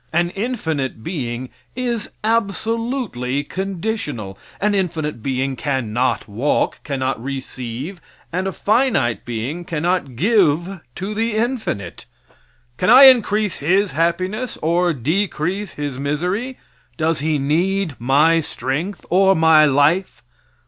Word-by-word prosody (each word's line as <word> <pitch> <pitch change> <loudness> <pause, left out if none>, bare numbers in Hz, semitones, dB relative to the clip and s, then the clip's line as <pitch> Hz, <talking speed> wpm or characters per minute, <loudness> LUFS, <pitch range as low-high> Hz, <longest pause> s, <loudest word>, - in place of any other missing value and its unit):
An 170 +1 +1
infinite 160 - -3
being 125 -6 -4 0.2
is 240 -3 -2
absolutely 220 - -1
conditional. 180 - -4 0.2
An 210 +1 +1
infinite 160 - -2
being 135 +1 -1
can 130 -4 -2
not 125 +3 0
walk, 115 +8 0
cannot 130 -5 -2
receive, 135 +4 -6 0.3
and 185 +2 -1
a - - -1
finite 210 - +1
being 120 +9 -4
cannot 170 -5 -1
give 185 - +2 0.2
to 195 +3 -4
the 225 +1 -1
infinite. 220 - -3 0.7
Can 180 - +1
I 270 - +9
increase 215 -7 +5
his 185 +5 +2
happiness 185 - -1
or 175 +2 +2
decrease 175 - -2
his 145 -3 -4
misery? 180 - -2 0.4
Does 160 -1 0
he 155 +1 0
need 170 +5 0
my 145 +7 +4
strength 155 +5 -4
or 190 +1 +5
my 160 -1 +6
life? 150 +6 +2
165 Hz, 115 wpm, -20 LUFS, 135-200 Hz, 0.7 s, I